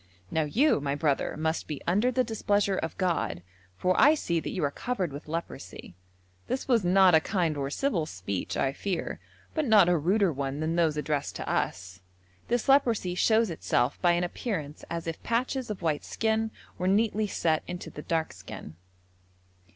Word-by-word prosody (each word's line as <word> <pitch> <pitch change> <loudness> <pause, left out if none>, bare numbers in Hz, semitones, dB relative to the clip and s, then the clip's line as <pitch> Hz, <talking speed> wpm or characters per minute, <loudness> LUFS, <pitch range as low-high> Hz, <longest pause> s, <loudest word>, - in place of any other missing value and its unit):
Now 160 -1 +1
you, 235 - +3
my 140 0 -1
brother, 145 -2 0
must 160 +1 -1
be 150 -3 -4
under 205 +8 +2
the 255 0 +2
displeasure 205 -4 +1
of 160 - -4
God, 115 - -1 0.3
for 180 - +2
I 295 +3 +7
see 170 - -1
that - - -5
you 185 - -3
are 140 - +1
covered 190 - -3
with 145 - -8
leprosy.' 155 - -6 0.5
This 260 - -2
was 235 -6 +3
not 185 0 +5
a 160 - +8
kind 170 -2 0
or 140 -1 -2
civil 175 - 0
speech, 95 - -4
I 135 0 +1
fear, 185 +3 -3 0.3
but 310 -3 0
not 210 -5 +6
a 175 - +4
ruder 190 +2 +2
one 140 +1 -3
than 160 +1 -1
those 160 -3 +2
addressed 150 -1 -2
to - - -5
us. 95 0 -2 0.5
This 240 -1 0
leprosy 235 -9 +3
shows 220 +2 +3
itself 125 -6 0
by 175 -1 +4
an 175 +1 +1
appearance 175 - -4
as 170 -1 -4
if 165 -1 -5
patches 250 +1 -1
of 200 -4 -5
white 155 -3 0
skin 220 0 0 0.3
were 180 - 0
neatly 215 +2 +2
set 160 -5 +1
into 180 0 -6
the 150 - -8
dark 160 0 -1
skin. 80 - -9
175 Hz, 180 wpm, -28 LUFS, 150-215 Hz, 0.5 s, a